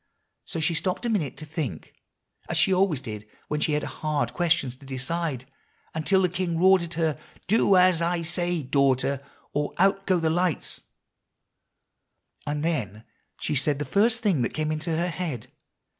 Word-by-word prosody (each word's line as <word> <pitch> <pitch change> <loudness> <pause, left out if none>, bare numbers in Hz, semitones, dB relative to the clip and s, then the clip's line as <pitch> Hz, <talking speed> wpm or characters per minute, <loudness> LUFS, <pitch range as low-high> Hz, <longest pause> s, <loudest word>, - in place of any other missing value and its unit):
So 170 - -4
she 160 +2 +1
stopped 180 +7 -1
a - - +1
minute 160 - -1
to 155 - -7
think, 150 - -5 0.6
as - - 0
she 190 - +4
always 185 -7 +2
did 105 -4 -7 0.2
when 150 - 0
she 150 - +1
had 150 - 0
hard 145 -6 -2
questions 155 -5 +1
to 140 - -16
decide, 135 0 -2 0.5
until 190 +5 +2
the - - +5
king 175 -1 -2
roared 190 +2 +6
at 170 0 -6
her, 160 -4 0 0.3
'Do 200 -1 +4
as 180 -2 +5
I 170 0 0
say, 175 0 -1
daughter, 135 0 +2 0.3
or 145 0 -1
out 195 +1 +2
go 185 -2 +3
the 160 -1 +1
lights;' 175 -2 -1 1.7
and 145 +1 -1
then 110 - -2 0.4
she - - -2
said 145 +1 +2
the 145 - -3
first 220 - +2
thing 185 - +2
that 120 - -1
came 155 0 -1
in 155 - -1
her 170 +2 0
head. 160 -10 -5
160 Hz, 175 wpm, -26 LUFS, 140-180 Hz, 1.7 s, roared